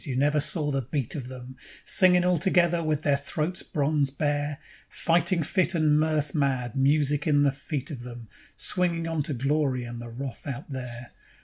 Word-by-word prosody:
You 135 Hz, -6 st, -4 dB
never 145 Hz, +3 st, +2 dB
saw 150 Hz, 0 st, +2 dB
the 135 Hz, -1 st, 0 dB
beat 135 Hz, 0 st, -3 dB
of 135 Hz, -7 st, -5 dB
them, 130 Hz, 0 st, -10 dB, 0.3 s
Singing 180 Hz, -1 st, +5 dB
all 180 Hz, -2 st, +2 dB
together 175 Hz, -1 st, +2 dB
with 155 Hz, -1 st, -1 dB
their 145 Hz, -2 st, +3 dB
throats 155 Hz, +5 st, -3 dB
bronze 145 Hz, -2 st, 0 dB
bare; 145 Hz, +1 st, -2 dB, 0.3 s
Fighting 170 Hz, 0 st, +1 dB
fit 180 Hz, +3 st, +1 dB
and 155 Hz, -2 st, +3 dB
mirth 155 Hz, -2 st, 0 dB
mad, 130 Hz, -5 st, -1 dB
music 145 Hz, +2 st, +2 dB
in 145 Hz, -2 st, +4 dB
the 140 Hz, -, +3 dB
feet 140 Hz, +1 st, -5 dB
of 130 Hz, -5 st, -6 dB
them, 120 Hz, -2 st, -9 dB, 0.3 s
Swinging 170 Hz, -2 st, +1 dB
on 165 Hz, -2 st, -1 dB
to 145 Hz, 0 st, -3 dB
glory 135 Hz, 0 st, 0 dB
and 120 Hz, 0 st, -7 dB
the 120 Hz, -, -8 dB
wrath 130 Hz, +2 st, -7 dB
out 140 Hz, +2 st, -6 dB
there. 125 Hz, -2 st, -7 dB
145 Hz, 185 wpm, -26 LUFS, 130-155 Hz, 0.3 s, Singing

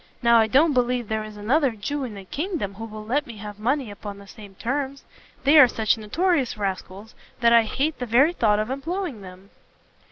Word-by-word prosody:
Now 235 Hz, 0 st, +6 dB
I 220 Hz, -, +3 dB
don't 290 Hz, +7 st, +4 dB
believe 250 Hz, -2 st, 0 dB
there 220 Hz, 0 st, -1 dB
is 215 Hz, -1 st, -10 dB
another 255 Hz, +5 st, +1 dB
Jew 270 Hz, +7 st, -4 dB
in 225 Hz, -4 st, -7 dB
the 195 Hz, -1 st, -10 dB
kingdom 300 Hz, -, -3 dB
who 225 Hz, +3 st, -7 dB
will 215 Hz, -1 st, -9 dB
let 275 Hz, +6 st, -1 dB
me 230 Hz, -2 st, -9 dB
have 210 Hz, 0 st, -9 dB
money 250 Hz, +1 st, -1 dB
upon 205 Hz, 0 st, -8 dB
the 200 Hz, -, -13 dB
same 200 Hz, -1 st, -13 dB
terms; 275 Hz, +5 st, -3 dB, 0.4 s
they 295 Hz, +3 st, +6 dB
are 270 Hz, -, +9 dB
such 220 Hz, -3 st, +1 dB
notorious 270 Hz, -, 0 dB
rascals, 195 Hz, +1 st, -5 dB, 0.3 s
that 235 Hz, -1 st, +4 dB
I 235 Hz, -, +7 dB
hate 275 Hz, +7 st, -2 dB
the 250 Hz, -, -4 dB
very 270 Hz, +9 st, +4 dB
thought 215 Hz, -10 st, +2 dB
of 215 Hz, +4 st, -2 dB
employing 300 Hz, -, -4 dB
them." 185 Hz, +1 st, -13 dB
230 Hz, 210 wpm, -24 LUFS, 210-275 Hz, 0.4 s, are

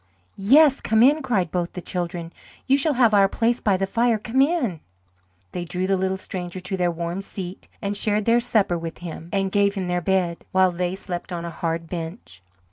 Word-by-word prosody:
"Yes, 275 Hz, +8 st, +5 dB
come 220 Hz, +1 st, +3 dB
in," 295 Hz, +4 st, +5 dB
cried 195 Hz, -, 0 dB
both 175 Hz, -1 st, -2 dB
the -, -, -5 dB
children. 175 Hz, -1 st, -4 dB, 0.3 s
"You 270 Hz, -, +4 dB
shall 285 Hz, +1 st, +1 dB
have 235 Hz, -3 st, +4 dB
our 200 Hz, -1 st, +6 dB
place 235 Hz, +3 st, +1 dB
by 200 Hz, -3 st, +2 dB
the 195 Hz, -, 0 dB
fire. 230 Hz, +3 st, +1 dB
Come 240 Hz, +5 st, 0 dB
in." 275 Hz, -, +1 dB, 0.7 s
They 175 Hz, -, -4 dB
drew 180 Hz, +2 st, -3 dB
the 195 Hz, +1 st, +2 dB
little 190 Hz, 0 st, -1 dB
stranger 185 Hz, -1 st, -6 dB
to 185 Hz, +2 st, -4 dB
their 180 Hz, -2 st, +1 dB
warm 170 Hz, +2 st, -3 dB
seat 190 Hz, -1 st, -8 dB, 0.2 s
and 200 Hz, +1 st, -1 dB
shared 210 Hz, 0 st, +1 dB
their 235 Hz, +1 st, +4 dB
supper 205 Hz, -7 st, +2 dB
with 165 Hz, 0 st, -6 dB
him, 165 Hz, 0 st, -7 dB
and 195 Hz, -1 st, 0 dB
gave 200 Hz, 0 st, +2 dB
him 190 Hz, -2 st, -3 dB
their 180 Hz, 0 st, 0 dB
bed, 175 Hz, -1 st, 0 dB
while 185 Hz, -1 st, +4 dB
they 180 Hz, +1 st, -2 dB
slept 185 Hz, -2 st, -6 dB
on 170 Hz, -1 st, -4 dB
a 170 Hz, -, -5 dB
hard 165 Hz, 0 st, -3 dB
bench. 165 Hz, -, -7 dB
190 Hz, 210 wpm, -23 LUFS, 175-220 Hz, 0.7 s, our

